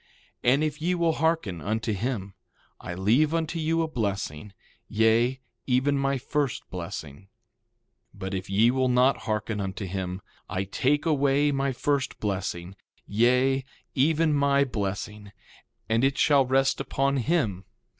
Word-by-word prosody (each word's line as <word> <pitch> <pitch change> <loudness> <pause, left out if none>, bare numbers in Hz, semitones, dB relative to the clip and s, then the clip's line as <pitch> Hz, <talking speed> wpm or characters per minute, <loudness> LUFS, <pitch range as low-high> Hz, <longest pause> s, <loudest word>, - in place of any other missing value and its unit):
And 135 +5 +4
if 150 0 -2
ye 180 +3 +1
will 170 -1 +2
hearken 160 - 0
unto 110 +2 -1
him 100 -2 -3 0.5
I 90 - -6
leave 125 - +2
unto 165 0 -1
you 165 +1 +1
a - - -1
blessing, 100 - -3 0.4
yea, 115 +4 +2 0.3
even 130 +2 +2
my 135 0 +1
first 140 -1 -2
blessing. 80 -5 -6
1:29 95 - -20 0.9
But 95 +1 -5
if 95 0 -4
ye 110 +5 +4
will 130 0 +1
not 125 +2 +4
hearken 105 -1 -1
unto 95 +1 -4
him 95 0 -4 0.3
I 95 -1 -1
take 135 - 0
away 145 -1 +2
my 135 0 0
first 140 +1 -1
blessing, 95 -3 -3 0.3
yea, 125 +5 +2 0.3
even 155 +3 +2
my 140 -1 +3
blessing, 105 -3 -4 0.5
and 115 +2 +1
it 135 0 +2
shall 140 -4 +4
rest 135 +1 +2
upon 140 +1 0
him. 120 - 0
125 Hz, 145 wpm, -26 LUFS, 100-140 Hz, 0.9 s, And